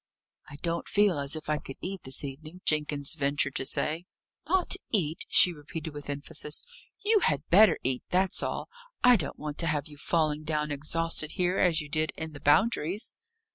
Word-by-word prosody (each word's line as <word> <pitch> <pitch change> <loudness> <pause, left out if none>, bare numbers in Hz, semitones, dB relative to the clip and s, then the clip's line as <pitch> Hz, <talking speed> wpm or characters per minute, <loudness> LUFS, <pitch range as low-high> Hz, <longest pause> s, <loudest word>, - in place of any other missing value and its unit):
"I 145 - -10
don't 170 -1 -2
feel 200 -6 +3
as 140 +2 0
if 155 - -7
I 150 -1 0
could 135 - -9
eat 190 0 -5
this 130 +2 -2
evening," 155 +6 -8
Jenkins 150 -2 0
ventured 140 -1 0
to 130 - -2
say. 160 +6 -2 0.4
"Not 370 0 +3 0.2
eat!" 165 -7 0
she 180 - +7
repeated 155 +1 -7
with 145 -1 -8
emphasis. 150 +1 0 0.4
"You 430 0 +5
had 145 - 0
better 210 +5 +6
eat 130 0 0
that's 185 0 +1
all. - - -3 0.4
I 250 0 +8
don't 155 -10 -2
want 150 -1 -6
to 165 - +1
have 150 -2 -1
you 150 -1 -12
falling 155 0 0
down 150 -1 -1
exhausted 155 +2 -2
here, 180 0 0
as 170 -3 +3
you 150 - -8
did 155 +2 -1
in 160 -1 -5
the 145 - -9
Boundaries." 185 - +1
155 Hz, 185 wpm, -28 LUFS, 145-175 Hz, 0.4 s, I